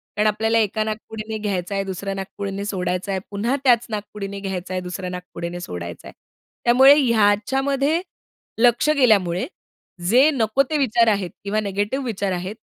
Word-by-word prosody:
कारण 210 +1 +2
आपल्याला 220 +2 +1
एका 215 0 0
नाकपुडीने 220 0 -5
घ्यायचा 200 -3 -3
आहे, 195 - 0
दुसऱ्या 195 +1 -4
नाकपुडीने 195 +1 -5
सोडायचा 185 -1 -2
आहे, 190 - -1
पुन्हा 220 +6 0
त्याच 240 -3 +4
नाकपुडीने 205 -2 -5
घ्यायचा 190 -2 -4
आहे, 185 - -1
दुसऱ्या 180 +1 -5
नाकपुडीने 180 -1 -6
सोडायचा 85 - -7
आहे. - - -11 0.5
त्यामुळे 260 +4 +8
ह्याच्यामध्ये 270 - +2 0.6
लक्ष 240 +4 +4
गेल्यामुळे 195 -9 +3 0.6
जे 260 +7 +6
नको 230 +1 +2
ते 310 - +1
विचार 235 -4 +3
आहेत 200 -4 +1
किंवा 205 +2 -1
निगेटिव्ह 205 +6 -2
विचार 200 -4 -2
आहेत 185 +3 -4
210 Hz, 150 wpm, -22 LUFS, 190-230 Hz, 0.6 s, त्यामुळे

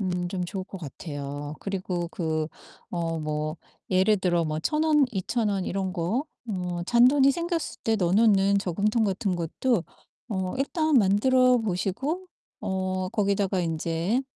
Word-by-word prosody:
음 180 -2 -1
좀 180 -1 -2
좋을 190 +1 -4
것 190 -1 -9
같아요. 145 -1 -6
그리고 185 -3 -3
그 160 -3 -1 0.4
어 165 -2 -2
뭐 155 +1 -2 0.3
예를 190 +3 +4
들어 175 -3 +1
뭐 155 -1 -2
1,000 305 - 0
원 300 -3 +5
2,000 215 +2 -1
원 195 -2 -1
이런 190 -1 -2
거 195 - -1 0.2
어 180 -3 -3
잔돈이 260 +4 +5
생겼을 340 0 -3
때 225 -1 +2
넣어 180 -3 +1
놓는 200 -2 +4
저금통 210 +4 +1
같은 190 -1 0
것도 175 +5 0 0.5
어 190 0 -2
일단 310 0 +2
만들어 250 +5 +4
보시고 225 - -2 0.3
어 185 -1 -2
거기다가 200 -3 +1
인제 165 +7 0
190 Hz, 245 characters per minute, -26 LUFS, 175-225 Hz, 0.5 s, 원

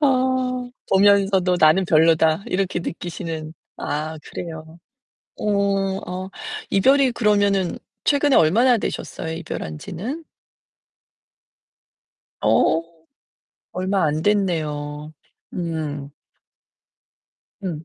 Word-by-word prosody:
어 255 -2 +1 0.2
보면서도 195 -2 +4
'나는 155 +5 +5
별로다.' 160 +1 +3
이렇게 190 -1 -1
느끼시는. 165 -2 -5 0.2
아 155 +2 -3
그래요. 160 -1 -8 0.6
어. - - -4
어 195 -2 -1 0.4
이별이 265 +6 +4
그러면은 205 -5 +2 0.3
최근에 285 -1 +3
얼마나 235 +10 +5
되셨어요? 160 -5 -4
이별한지는? 175 - -6 2.2
어 160 - +3 0.9
얼마 190 0 0
안됐네요. 155 -3 -1 0.4
음. 155 -5 -4 1.5
음. 165 -5 -4
185 Hz, 180 characters per minute, -22 LUFS, 160-205 Hz, 2.2 s, 나는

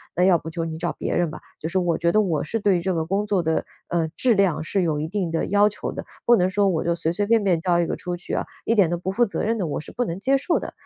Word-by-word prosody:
那 180 - +2
要 180 -2 +5
不 160 - -7
就 165 +1 -3
你 160 -1 -5
找 170 0 -2
别 - - -3
人 175 -2 +1
吧。 155 - -9 0.2
就 160 - -4
是 190 - -1
我 175 -3 +1
觉 170 0 +2
得 215 - +4
我 170 -7 0
是 225 +10 -2
对 200 -4 +2
这 190 - -1
个 160 -1 -1
工 200 +5 -1
作 195 -4 +1
的， 160 0 0 0.2
呃， 170 -2 +1
质 250 -2 +3
量 195 -6 +2
是 190 +5 0
有 155 -4 0
一 155 - -2
定 190 0 -2
的 165 0 -1
要 205 +1 +4
求 210 - -5
的， - - -6 0.2
不 240 - +6
能 180 0 +2
说 200 +1 +2
我 165 -4 0
就 170 0 +1
随 165 -1 -1
随 205 +4 -1
便 225 -1 +3
便 180 -4 +2
交 175 0 +2
一 170 - +2
个 - - -2
出 180 -1 -4
去 175 - -7
啊， - - -1 0.2
一 230 - +2
点 200 -7 +4
都 175 - -1
不 180 +2 -3
负 240 +5 +3
责 205 - -3
任 225 +2 0
的 180 - -1
我 150 - -2
是 - - -9
不 245 - -1
能 170 -4 -4
接 270 +6 +2
受 335 +5 0
的。 - - -5
180 Hz, 350 characters per minute, -23 LUFS, 165-205 Hz, 0.2 s, 不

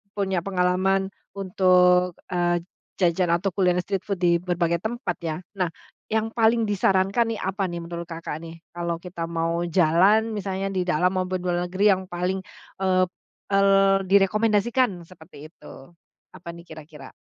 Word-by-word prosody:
punya 190 -3 0
pengalaman 190 +1 +1 0.3
untuk, 180 -2 +3 0.2
eee, 175 -1 +1 0.3
jajan 180 0 +2
atau 175 +3 +1
kuliner 180 -2 +2
street 195 -2 -2
food 200 -2 -1
di 170 -1 +4
berbagai 175 -1 0
tempat 220 -4 -3
ya. 160 -2 -3 0.2
Nah, 180 - +2 0.4
yang 220 0 0
paling 230 0 +3
disarankan 195 +2 +1
nih - - -6
apa 190 0 -1
nih 170 -1 -5
menurut 170 0 -6
Kakak 165 -2 -6
nih? 165 0 -11
Kalau 170 0 -2
kita 170 -1 -6
mau 165 0 -1
jalan 185 +6 +3
misalnya 195 -1 -3
di 185 - 0
dalam 180 +1 +2
maupun 185 0 -1
luar 175 0 -1
negeri 195 +3 +3
yang 190 -1 -1
paling, 180 +2 -2 0.4
eee, 185 -1 +2 0.4
el 195 0 +3 0.4
direkomendasikan 205 0 +2
seperti 160 -4 -13
itu. 160 - -15 0.6
Apa 170 - -8
nih 170 0 -13
kira-kira? 150 -4 -12
180 Hz, 150 wpm, -24 LUFS, 170-195 Hz, 0.6 s, di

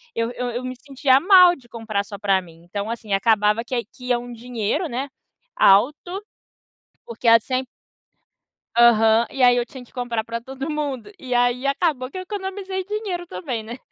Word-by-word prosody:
eu 230 +1 -1
eu 245 0 -4
eu 245 +2 -4
me 255 - -5
sentia 265 0 +2
mal 360 0 +7
de 250 -6 -20
comprar 220 -4 -3
só 205 -1 -9
pra 195 -2 +2
mim. 165 -2 -16
Então, 200 +4 -4
assim, 225 -3 -4
acabava 210 +2 +2
que 245 -1 -2
que 250 +3 -14
ia 245 -1 +2
um 245 0 -9
dinheiro, 240 - -2
né, 260 +4 -3 0.5
alto, 295 - +3 0.8
porque 235 +1 -5
a 230 0 +9
sem 255 +3 -2 1.1
Aham, 225 -1 +5
e 265 -2 -1
aí 245 0 +6
eu 240 - 0
tinha 255 +1 -11
que 245 - -21
comprar 235 -3 -3
para 230 +1 -4
todo 265 +4 -7
mundo. 290 - -3
E 255 -4 -4
aí 245 +2 +2
acabou 275 -3 0
que 370 - -9
eu - - -3
economizei 380 -1 -5
dinheiro 405 -4 -4
também, 250 -11 -5
né. 235 +3 -8
245 Hz, 185 wpm, -22 LUFS, 230-285 Hz, 1.1 s, a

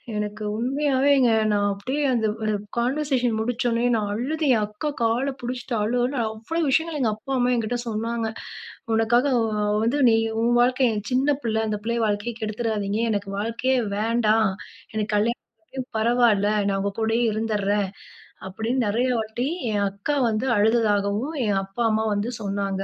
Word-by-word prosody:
எனக்கு 210 +1 -3
உண்மையாவேங்க 270 0 +2 0.2
நான் 205 -1 +2
அப்டியே 260 +9 -3
அந்த 225 -3 +1 0.2
அ - - 0 0.3
கான்வர்சேஷன் 250 -2 0
முடிச்சோனே 240 +1 0
நான் 210 -2 -1
அழுது 300 +9 -2
என் 215 - +1
அக்கா 210 +8 -4
கால 245 +5 +1
புடிச்சிட்டு 245 0 -4
அழு 220 +4 0
அழுனு 250 +2 0
அவ்வளோ 220 +10 -3
விஷயங்கள் 320 +2 +1
எங்க 225 -4 +2
அப்பா, 245 +6 -9
அம்மா 250 0 +2
என்கிட்ட 235 +1 -1
சொன்னாங்க, 225 +1 -2 0.7
"உனக்காக 230 +3 +3
அ 215 -2 0 0.2
வந்து 245 +6 +1
நீ 225 - +4 0.3
உன் 240 +1 +3
வாழ்க்கை 255 +1 +3 0.2
சின்ன 270 +3 +2
பிள்ள, 220 -2 0
அந்த 210 -1 -2
பிள்ளைய 235 +1 0
வாழ்க்கையை 205 +3 -2
கெடுத்துராதீங்க. 215 -1 -2
எனக்கு 200 -1 -2
வாழ்க்கையே 230 +4 0 0.2
வேண்டாம். 220 -1 +2 0.4
எனக்கு 215 0 -2
கல்யாணம் 225 +3 +2 0.7
பரவால. 230 -3 +3 0.2
நான் 195 0 0
உங்க 200 +1 -1
கூடயே 225 +2 +1
இருந்துறேன்". 205 -2 0 0.6
அப்டின் 225 +7 -1
நெறைய 235 +5 +1
வாட்டி 220 +4 -3 0.3
என் 205 -1 +1
அக்கா 200 +9 -2
வந்து 220 +4 -1
அழுததாகவும் 215 +5 +1
என் 200 -2 +2
அப்பா, 195 +5 -3
அம்மா 220 0 +1
வந்து 205 +4 -2
சொன்னாங்க. 195 -1 -2
225 Hz, 150 wpm, -24 LUFS, 210-245 Hz, 0.7 s, நீ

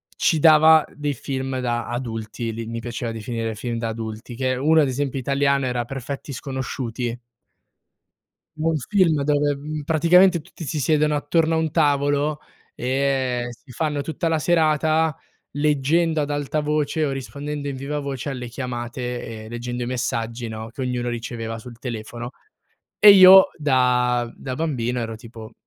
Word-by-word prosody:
ci 160 - +2
dava 155 0 +7
dei 145 -1 -2
film 130 -1 -4
da 120 -2 -2
adulti, 115 -1 -4
li 115 +1 -5
mi 115 +1 -5
piaceva 120 0 -4
definire 115 0 -4
film 115 +2 -4
da 115 0 -2
adulti, 110 +2 -6
che 130 +1 0
uno, 155 +5 +4
ad 145 - +2
esempio, 135 +1 -2
italiano, 140 +1 +1
era 125 -1 -1
perfetti 135 +3 -6
sconosciuti. 125 -3 -4 1.4
Un 160 +1 +1
film 165 -1 +2
dove, 145 +1 -1
praticamente, 175 +3 +5
mhmm, - - -14
tutti 170 0 -11
si 150 +1 -3
siedono 150 +1 +2
attorno 160 +3 +1
a - - +2
un 160 0 0
tavolo 145 -1 +1 0.3
e 130 -1 0
si 125 +3 -15
fanno 150 +1 -1
tutta 160 +3 -3
la 160 -1 +1
serata 160 -1 +2 0.4
leggendo 150 +3 +1
ad 145 - -3
alta 145 +1 -1
voce 150 +1 0
o 140 - -1
rispondendo 140 +2 -5
in 140 - -3
vivavoce 140 0 -4
alle 125 -3 -5
chiamate 120 -2 -5
e - - -10
leggendo 120 +1 -4
i - - -3
messaggi, 120 -1 -3
no, 110 0 -6
che 120 - -8
ognuno 125 -1 -2
riceveva 115 -1 -5
sul 120 +1 -11
telefono. 120 0 -6 0.7
E 210 - +9
io 190 0 +9
da 125 -4 +2
da 130 - -5
bambino 125 -5 -2
ero 115 -1 -4
tipo: 110 0 -11
135 Hz, 155 wpm, -22 LUFS, 120-150 Hz, 1.4 s, E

